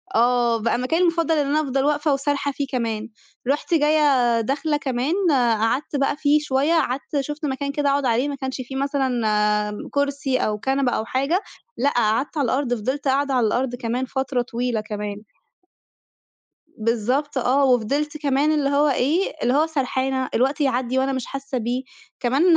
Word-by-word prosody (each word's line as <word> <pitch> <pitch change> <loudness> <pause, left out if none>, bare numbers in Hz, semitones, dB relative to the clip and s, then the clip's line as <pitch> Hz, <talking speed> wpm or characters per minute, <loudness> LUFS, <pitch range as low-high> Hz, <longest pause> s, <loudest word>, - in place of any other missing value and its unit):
آه 240 0 +3
بقى 235 +2 +1
مكاني 290 +8 0
المفضل 335 -2 +2
إن 290 - +2
أنا 300 +2 +2
أفضل 270 -2 -1
واقفة 295 0 +2
وسارحة 285 +1 -1
فيه 280 +1 -3
كمان، 230 -3 -2 0.4
رُحت 290 +5 0
جايّة 290 -6 +3
داخلة 285 +5 0
كمان 265 +1 -1 0.2
قعدت 240 +2 +1
بقى 280 0 +1
فيه 295 0 +3
شويّة، 285 +2 +1
قعدت 280 -2 0
شُفت 295 +3 -5
مكان 280 0 -2
كده 285 0 0
أقعد 280 0 +1
عليه 245 +3 +2
ما 285 - -3
كانش 265 -1 -4
في 255 +1 -8
مثلًا 275 0 0 0.8
كرسي 280 -2 0
أو 210 -4 -1
كنبة 265 +1 0
أو 220 - -1
حاجة 275 - 0 0.4
لأ، 280 - +2
قعدت 240 +4 0
على 285 - +2
الأرض 255 +1 0
فضلت 260 +5 -2
قاعدة 275 +1 +1
على 245 -4 +3
الأرض 245 +3 -1
كمان 245 +1 -2
فترة 265 -1 -1
طويلة 240 -2 -2
كمان. 210 -1 -5 1.6
بالضبط 240 +6 0
آه 260 +3 +3
وفضلت 275 +5 +1
كمان 285 +1 +1
اللي 295 -3 +1
هو 285 +1 +3
إيه، 295 +8 +1
اللي 245 - +2
هو 305 +3 +3
سرحانة 265 -3 -1
الوقت 270 +5 +1
يعدّي 260 -2 0
وأنا 270 +1 0
مش 260 -2 -3
حاسّة 275 -1 -5
بيه، 245 +2 -2 0.4
كمان 265 +5 +1
270 Hz, 165 wpm, -22 LUFS, 245-285 Hz, 1.6 s, آه